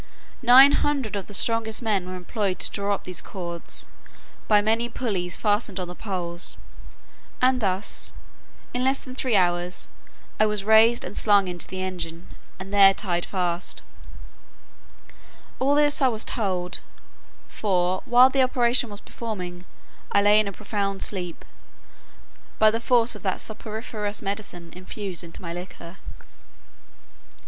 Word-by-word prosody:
Nine 260 +3 +8
hundred 275 -8 0
of 195 -2 -4
the 205 - -10
strongest 230 +2 +2
men 200 -5 0
were 185 - -5
employed 185 +1 -2
to - - -2
draw 200 0 0
up - - -11
these 180 -2 -4
cords, 170 -3 -5 0.6
by 210 -1 +5
many 225 +3 +1
pulleys 195 -8 -3
fastened 205 -2 0
on 180 - -3
the 175 - -7
poles; 180 -3 -3 0.8
and 255 0 +3
thus, 190 0 -2 0.6
in 250 +1 -1
less 265 +1 +1
than 255 - -9
three 255 -3 0
hours, 175 -1 +1 0.5
I 215 - +5
was 210 -2 -1
raised 220 +3 +5
and 180 - -8
slung 200 -3 +4
into 175 -1 -1
the 185 0 -5
engine, 175 -2 -5 0.3
and 195 +1 -8
there 195 -1 +7
tied 175 -4 -2
fast. 180 -2 -2 1.8
All 275 +2 +2
this 295 0 +3
I 265 - +5
was 225 -3 -2
told; 185 -5 -2 0.7
for, 185 -3 0
while 250 +2 +6
the 270 - +2
operation 245 -1 +3
was 205 0 -8
performing, 180 -6 -7 0.5
I 200 - +3
lay 205 +1 +6
in 215 - +1
a - - -3
profound 200 -1 -3
sleep, 180 -4 -4 1.1
by 215 0 +5
the 225 - -1
force 235 0 +3
of 210 - -9
that 190 -2 -2
soporiferous 215 -1 -5
medicine 195 -4 -5
infused 185 -1 -6
into 170 +2 -9
my 170 -1 -5
liquor. 175 0 -9
205 Hz, 145 wpm, -24 LUFS, 180-230 Hz, 1.8 s, Nine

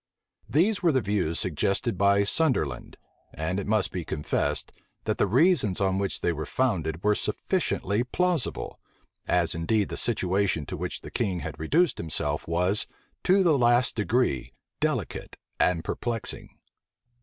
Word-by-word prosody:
These 180 - +2
were 170 -3 +4
the 135 - +3
views 95 -7 0
suggested 95 - 0
by 100 +1 +4
Sunderland, 100 - 0 0.4
and 85 +5 -2
it 100 - -5
must 110 -1 +1
be 90 - -3
confessed, 75 -1 -2 0.3
that - - -2
the - - +3
reasons 130 - +3
on 95 -1 +1
which 100 -1 -2
they 85 - +1
were 75 -1 -5
founded 85 -10 -1
were 105 0 +4
sufficiently 105 +1 -1
plausible; 175 - -1 0.5
as 90 -2 +2
indeed 100 +6 0
the - - -4
situation 95 -7 +1
to - - -5
which - - -4
the - - -10
king 90 -4 -1
had - - -6
reduced 155 - +2
himself 75 -2 -2
was, 90 +5 +2 0.4
to 190 +1 +5
the 155 -6 +3
last 120 0 +3
degree, 110 - 0 0.3
delicate - - -2 0.2
and 85 -2 +2
perplexing. 115 -3 -3
100 Hz, 145 wpm, -27 LUFS, 85-125 Hz, 0.5 s, to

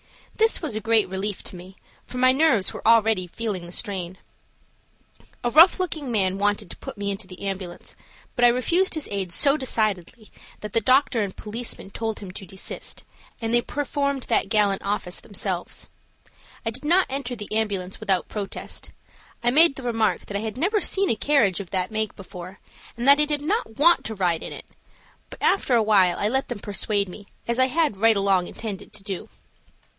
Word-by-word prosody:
This 445 +1 +3
was 295 -9 -1
a 215 - -2
great 225 -1 +3
relief 190 +2 -3
to - - -8
me, 185 +2 -11 0.3
for 250 - -7
my 255 +1 +5
nerves 265 -8 +3
were - - -5
already 220 -5 +4
feeling 195 -3 -4
the - - -10
strain. 185 -3 -4 1.3
A 240 - 0
rough 330 +7 +7
looking 315 -7 -2
man 195 -3 +1
wanted 205 -2 0
to - - -9
put - - -9
me 200 0 -2
into 195 -1 -5
the 185 0 -10
ambulance, 190 -3 -5 0.4
but 245 - 0
I - - +9
refused 330 +11 +2
his 315 - -4
aid 195 -3 -2
so 275 - +5
decidedly 215 - -2 0.3
that 210 -1 -7
the 230 - +3
doctor 255 0 +3
and 200 -2 -3
policeman 220 -2 -5
told 220 0 -3
him 195 -3 -8
to 195 +1 -10
desist, 190 +2 -6 0.4
and 225 -1 -2
they 240 - +5
performed 280 -1 -2
that - - +1
gallant 205 -2 +2
office 200 -2 -2
themselves. 190 -3 -4 0.8
I 225 - 0
did 250 +5 -7
not 350 +5 +4
enter 265 -2 -3
the 210 -2 -6
ambulance 200 -4 -2
without 190 -2 0
protest. 205 -2 -5 0.5
I 240 - +3
made 305 +1 +6
the 265 - -8
remark 225 -3 0
that 200 - -7
I - - -3
had 220 +1 -5
never 400 - +1
seen 390 0 +3
a - - +2
carriage 225 -9 +2
of 195 -3 -7
that 185 0 -1
make 215 -1 -1
before, 185 -1 -10 0.4
and 240 +2 -2
that 280 +1 +8
I 300 - +5
did 295 -1 -1
not 350 - -1
want 340 +4 +5
to 220 - -4
ride 175 -4 0
in - - -6
it, - - -9 0.6
but - - -11
after 275 -10 +3
awhile 205 -6 +4
I 205 - +1
let 265 +4 0
them - - -4
persuade 205 0 -1
me, 200 +3 -11 0.2
as 235 +1 -1
I 260 - +5
had 300 -6 0
right 225 +2 +4
along 195 -3 +2
intended 205 -2 -7
to 210 -2 -11
do. 195 -3 -6
215 Hz, 195 wpm, -24 LUFS, 195-260 Hz, 1.3 s, I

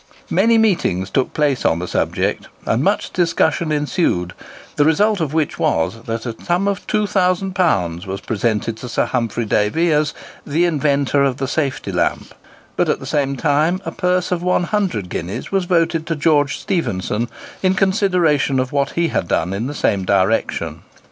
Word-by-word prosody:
Many 225 +6 +4
meetings 170 - +1
took 130 - 0
place 145 -4 0
on 80 - +2
the 90 +1 -4
subject, - - -1 0.2
and - - +1
much - - 0
discussion 165 -2 +1
ensued, 145 - 0 0.4
the 145 - +3
result 200 +6 +2
of 155 -4 -1
which 155 -3 0
was 80 +8 0
that 115 +1 -3
a 115 -2 -4
sum 180 +3 +1
of 200 -2 -2
£2000 180 - +1
was 95 +1 -4
presented 110 0 -1
to 125 +2 -8
Sir - - +1
Humphry 115 -2 -1
Davy 110 +12 +1
as 150 0 +1 0.3
"the 160 +5 +1
inventor 145 -3 +1
of 135 -2 +1
the 135 - -2
safety 140 -2 -2
lamp;" - - -1 0.4
but, - - +1
at - - +1
the - - -9
same 140 -2 0
time, 150 +7 +1
a - - -3
purse 180 0 0
of 175 -1 0
100 180 - 0
guineas 90 +7 -5
was 195 -2 +1
voted 165 -2 +1
to 165 - -1
George 150 -2 +2
Stephenson, 115 - -2 0.3
in 185 0 +2
consideration 180 -8 +2
of 130 0 -1
what 140 -1 0
he 170 -1 +1
had - - -1
done 90 +3 0
in 110 +5 -2
the 145 - -5
same 100 -7 +1
direction. 100 +4 0
150 Hz, 170 wpm, -19 LUFS, 115-175 Hz, 0.4 s, Many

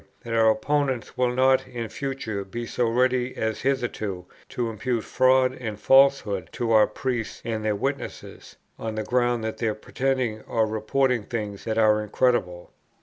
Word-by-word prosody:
that 115 - -5
our 110 -1 +5
opponents 130 +1 0
will 125 -1 +1
not 130 +1 +3
in 120 -2 -5
future 130 -7 -4
be 120 +5 -6
so 120 +1 0
ready 125 +1 +1
as 110 0 -2
hitherto, 115 -8 -2 0.2
to 120 -2 -2
impute 115 +1 -2
fraud 130 0 +3
and 110 -5 -6
falsehood 135 -11 +4
to 115 -1 -2
our 110 -1 +6
priests 125 -4 -3
and 110 -2 -2
their 105 -1 +1
witnesses, 135 +7 -5 0.2
on 110 -1 -4
the 110 - -2
ground 120 -1 +1
of 110 - -4
their 110 -2 -1
pretending 125 -1 -2
or 115 -1 +1
reporting 115 +4 0
things 105 -2 -5
that 110 -1 -2
are 105 -1 +4
incredible. 105 -5 0
115 Hz, 160 wpm, -25 LUFS, 110-130 Hz, 0.2 s, our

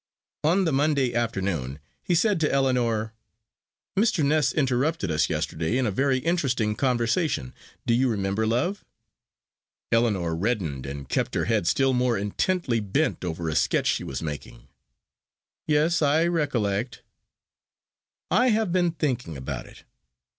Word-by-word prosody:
On 180 +5 +3
the 160 - +1
Monday 140 -3 +2
afternoon 95 - -2 0.2
he 180 - 0
said 200 +1 +2
to 155 - +1
Ellinor, 120 -5 +1 0.8
"Mr. 200 -7 +2
Ness 150 +1 +2
interrupted 135 - 0
us 75 - +1
yesterday 80 +9 -1
in 130 - +1
a 110 - 0
very 135 +6 +1
interesting 130 -8 0
conversation. 125 - 0 0.3
Do 115 - +2
you 125 +2 +3
remember, 100 0 -1
love?" 150 - 0 1.1
Ellinor 105 -8 +1
reddened 85 - -2
and 70 -1 -6
kept - - -1
her - - +1
head 85 - +1
still 135 +9 +3
more 125 -2 +1
intently 120 - 0
bent 110 +8 -1
over 85 -1 -3
a 80 - -1
sketch - - +2
she - - +1
was 65 +3 -5
making. 75 -2 -7 1.0
"Yes; 155 +3 +2
I 155 +3 +3
recollect." 125 - -1 1.3
"I 250 +3 +4
have 220 -5 +2
been 175 -2 +2
thinking 125 - -2
about 65 - -5
it. - - -16
125 Hz, 140 wpm, -25 LUFS, 100-155 Hz, 1.3 s, I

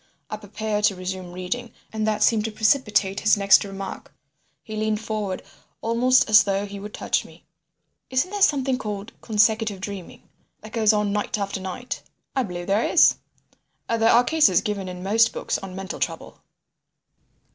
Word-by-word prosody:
I 215 - -3
prepared 210 0 -2
to 205 -2 +2
resume 185 -1 -5
reading, 185 +7 -5 0.2
and 220 0 -1
that 215 -1 +1
seemed 220 -2 +3
to 225 - -3
precipitate 210 -3 +1
his 215 0 +3
next 200 +1 +5
remark. 195 -1 -7 0.5
He 215 - -7
leant 215 0 0
forward 215 -4 -4 0.4
almost 245 +3 +3
as 215 -1 +7
though 200 0 -1
he 200 0 -8
would 210 +1 -8
touch - - 0
me. - - -17 0.6
"Isn't 260 +9 0
there 410 -1 -4
something 270 -7 +3
called 210 -3 -5
consecutive 215 -1 +1
dreaming—that 200 +2 -10
goes 220 -2 +4
on 210 -1 0
night 210 0 -1
after 200 -1 -3
night?" 190 +7 -6 0.3
"I 265 - +2
believe 175 -6 -5
there 200 +4 +1
is. 335 - +5 0.7
There 225 0 +2
are 240 - +6
cases 315 +3 +4
given 200 -4 -3
in 180 0 -8
most 225 +4 +3
books - - -2
on 190 -1 -8
mental 190 +1 -6
trouble." - - -4
210 Hz, 165 wpm, -24 LUFS, 195-225 Hz, 0.7 s, as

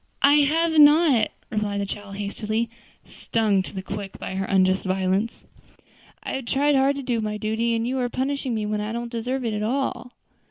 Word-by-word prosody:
"I 285 +1 +7
have 320 +2 +3
not," 295 -6 +6 0.2
replied 210 -2 -1
the 200 - -1
child 200 0 -7
hastily, 215 +3 -3 0.3
stung 215 -4 0
to - - -8
the 190 -2 -6
quick 200 0 -6
by - - -6
her 195 +1 -2
unjust 190 -1 +2
violence. 190 +3 -1 0.8
"I - - -4
have 265 -2 -4
tried 285 +4 +2
hard 270 +1 +3
to 280 - -5
do 240 -3 -1
my 210 0 -3
duty, 220 +2 0
and 230 +1 -1
you 260 +1 -1
are 245 -1 0
punishing 265 -1 -2
me 215 -1 -2
when 210 0 -1
I 210 +2 -4
don't 235 0 -4
deserve 250 +2 -3
it 225 - -1
at 210 - -2
all." 250 +1 -2
230 Hz, 200 wpm, -24 LUFS, 205-265 Hz, 0.8 s, I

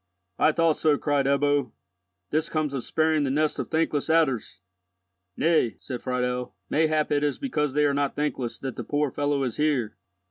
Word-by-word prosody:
"I - - +5
thought 165 0 +2
so," 150 -2 +3
cried 145 -2 +1
Ebbo. 140 -2 +1 0.6
"This 155 +1 0
comes 155 -3 -1
of 135 -3 -3
sparing 155 -1 +1
the 140 - 0
nest 150 +3 0
of - - -2
thankless 160 -2 0
adders!" 150 - +1 0.8
"Nay," 155 -8 +2
said 125 -3 -6
Friedel, 125 -3 -2 0.2
"mayhap 155 -1 +2
it 145 0 +2
is 145 -1 0
because 150 - -2
they 150 0 +3
are 145 - +2
not 140 0 0
thankless 145 -5 -2
that 135 -2 -6
the - - -4
poor 145 -1 0
fellow 145 0 0
is 125 -3 -3
here." 140 -8 0
145 Hz, 180 wpm, -26 LUFS, 135-155 Hz, 0.8 s, I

